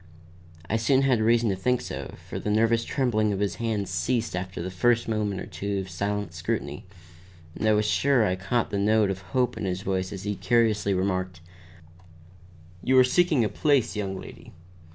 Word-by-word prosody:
I 110 - 0
soon 130 +4 +3
had 130 -5 +3
reason 115 0 +3
to - - -1
think 125 +6 +1
so, - - -7
for - - -5
the - - -3
nervous 115 +2 +2
trembling 115 -6 0
of 100 - -2
his 100 -1 -1
hands 110 -5 -2
ceased 110 +6 -1
after 90 0 -5
the 90 +2 -4
first 115 +6 +2
moment 105 -3 -1
or - - -5
two 100 0 -4
of 95 -1 -5
silent 100 0 -3
scrutiny, 90 -3 -4 0.7
and 110 - -1
I - - +5
was 105 0 +2
sure 130 +1 +3
I 90 -2 +1
caught 105 +6 -1
the 100 - -1
note 105 0 +3
of 95 0 -5
hope 125 +5 -1
in - - -3
his 95 0 -3
voice 95 0 -2
as 100 -1 -7
he 105 0 -1
courteously 110 -4 +2
remarked: 95 -2 -2 1.4
"You 130 0 +3
are 130 - +8
seeking 150 0 +3
a - - +2
place, 135 -2 +1
young 95 -2 -3
lady. - - -12
105 Hz, 195 wpm, -26 LUFS, 95-115 Hz, 1.4 s, are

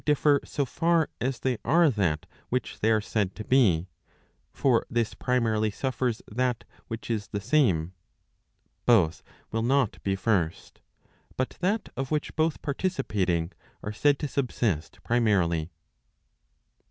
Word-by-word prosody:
differ 150 -1 +3
so 140 - -2
far 165 +5 +1
as 130 0 -2
they 130 -3 0
are 170 +3 +4
that 90 -9 0 0.2
which 125 +1 -2
they 110 - +2
are 110 -1 +3
said 105 -3 -1
to 110 - -6
be; 100 -10 +3 0.6
for 125 -4 +2
this 115 -2 0
primarily 115 -4 +1
suffers 125 +1 -2
that 125 +1 -1 0.2
which 115 +1 -5
is 105 -3 -2
the 100 - -3
same; 95 - +2 0.9
both 95 -9 +4 0.3
will 115 - 0
not 130 0 +1
be 95 -1 0
first, 95 -5 -1 0.6
but 130 - 0
that 200 +5 0
of 135 0 -3
which 150 -1 -2
both 160 -1 0
participating, 100 - -1 0.3
are 105 - -4
said 145 +5 +3
to 150 - -3
subsist 120 - -1
primarily. 95 -9 +2
115 Hz, 135 wpm, -27 LUFS, 100-135 Hz, 0.9 s, are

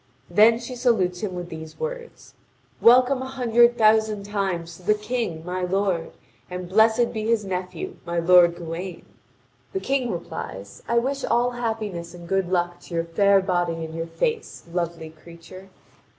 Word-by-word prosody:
Then 215 +5 +6
she 240 +2 -7
salutes 215 -8 +1
him 195 -4 -3
with 175 -1 -6
these 160 -1 -9
words: 475 0 -7 0.5
"Welcome 255 +2 +5
a 260 - -4
hundred 240 -2 +3
thousand 215 -1 +3
times 190 -5 -3
to - - -17
the 210 +4 +2
King, 210 -7 -3
my 180 +1 -3
lord, 180 -2 0 0.4
and 180 0 -6
blessed 220 +5 +3
be 220 -1 -3
his 225 -3 +1
nephew, 185 -2 -5
my 170 0 -4
lord 170 0 +6
Gawain!" 170 +1 -6 0.7
The 385 - -1
King 270 -7 -1
replies: 100 - -7
"I 235 - +1
wish 270 +3 0
all 245 +1 +2
happiness 215 -8 -4
and 170 -1 -11
good 195 -1 0
luck 175 -1 0
to 170 - -9
your 165 - +1
fair 200 +4 +3
body 175 -3 -1
and 160 - -9
your 165 0 -4
face, 460 - -3
lovely 170 -2 -3
creature!" 170 +4 -14
190 Hz, 165 wpm, -24 LUFS, 170-230 Hz, 0.7 s, Then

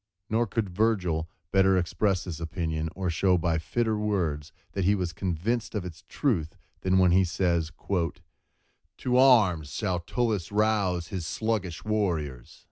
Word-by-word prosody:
Nor 115 +1 +2
could 110 0 -1
Virgil 90 -5 0 0.2
better 95 -1 +4
express 90 +1 0
this 85 -4 -6
opinion, 80 -2 -2
or 95 -2 -1
show 90 +3 +3
by 85 -1 0
fitter 110 +6 0
words 85 -8 -1 0.2
that 95 - -2
he 100 +3 +4
was 90 -4 -2
convinced 100 +8 -2
of 100 -3 -2
its 90 0 -9
truth 85 - 0 0.2
than, 95 0 +2
when 90 -1 +5
he 95 +2 +5
says:— 85 -2 0 1.3
"To 125 0 +1
arms 100 - +5
shall 90 +6 -1
Tullus 105 0 -1
rouse 100 -5 +1
His 90 -4 -4
sluggish 105 -3 -2
warriors." 80 - -2
95 Hz, 145 wpm, -27 LUFS, 85-105 Hz, 1.3 s, when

